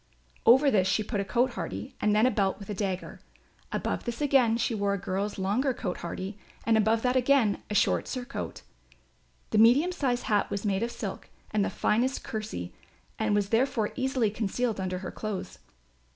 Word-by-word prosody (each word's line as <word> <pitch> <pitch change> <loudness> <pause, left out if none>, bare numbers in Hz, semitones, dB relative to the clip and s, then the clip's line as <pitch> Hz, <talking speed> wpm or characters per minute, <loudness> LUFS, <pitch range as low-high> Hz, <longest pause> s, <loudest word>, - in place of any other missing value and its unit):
Over 265 +4 +7
this 190 -5 +3
she 215 +3 +1
put 205 0 -3
a - - +1
cote 245 +6 +1
hardie 260 +2 -5
and 210 0 +3
then 215 +3 +5
a 255 - +4
belt 195 -5 +1
with 200 0 -8
a - - -1
dagger. 190 -2 -3 0.5
Above - - -2
this 235 -1 -4
again 265 -6 +3
she 235 - 0
wore 200 -2 0
a - - -2
girl's 200 +2 -3
longer 230 +8 0
cote 180 -6 -3
hardie 190 +4 -5 0.3
and 230 - +4
above 220 +1 +2
that 250 0 +2
again 255 -5 +3
a 210 - -2
short - - +2
surcoat. 255 0 -5 0.9
The 215 - +3
medium 255 +11 +6
sized 255 -8 -1
hat 210 -1 +1
was 200 +1 -3
made 195 -1 +1
of 235 - 0
silk - - -6 0.2
and 210 -1 +2
the - - 0
finest 245 +5 0
kersey 215 - -5 0.5
and 215 -1 +1
was 205 -1 +1
therefore 230 -1 +1
easily 260 -5 +1
concealed 220 +1 -1
under 185 -1 -2
her - - -4
clothes. 215 -3 -5
220 Hz, 190 wpm, -28 LUFS, 200-250 Hz, 0.9 s, Over